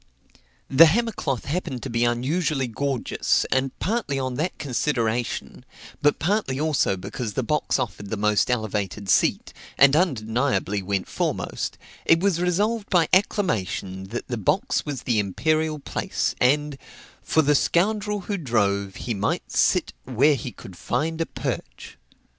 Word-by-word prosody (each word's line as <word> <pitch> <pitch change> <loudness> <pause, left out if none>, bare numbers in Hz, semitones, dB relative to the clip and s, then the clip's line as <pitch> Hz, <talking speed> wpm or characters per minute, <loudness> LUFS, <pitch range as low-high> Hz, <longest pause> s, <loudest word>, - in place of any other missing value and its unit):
The 160 +5 +8
hammer 230 +8 +1
cloth 135 - -3
happened 145 -5 -3
to - - -4
be 115 +1 +2
unusually 135 +4 0
gorgeous; 130 +2 0
and 130 0 0
partly 210 -10 -1
on 130 -1 -2
that 155 +8 -2
consideration, 120 -4 -2 0.4
but 145 0 +3
partly 175 -7 0
also 150 -10 +1
because 105 +4 -5
the 130 - -1
box 150 +5 0
offered 105 -3 -4
the 110 - -2
most 105 +2 +2
elevated 105 -4 -2
seat, 95 - +2 0.2
and 140 +1 +6
undeniably 115 - 0
went 95 0 -2
foremost, - - -3 0.3
it 165 - +4
was 180 -2 +1
resolved 205 +5 0
by 175 -5 +3
acclamation 100 - 0
that 115 +5 -6
the 120 - -3
box 150 - 0
was 140 -3 -4
the 120 -4 +1
imperial 155 - 0
place, 145 - -2
and, 145 +2 +2 0.4
for 160 - +2
the 150 +1 +3
scoundrel 205 +7 +1
who 200 +2 -3
drove, 100 - 0
he 120 - -3
might 100 0 -2
sit - - +2
where 135 +4 +3
he 135 -2 -4
could 95 -3 -12
find 160 - -2
a 165 - -1
perch. - - -6
135 Hz, 145 wpm, -24 LUFS, 110-160 Hz, 0.4 s, The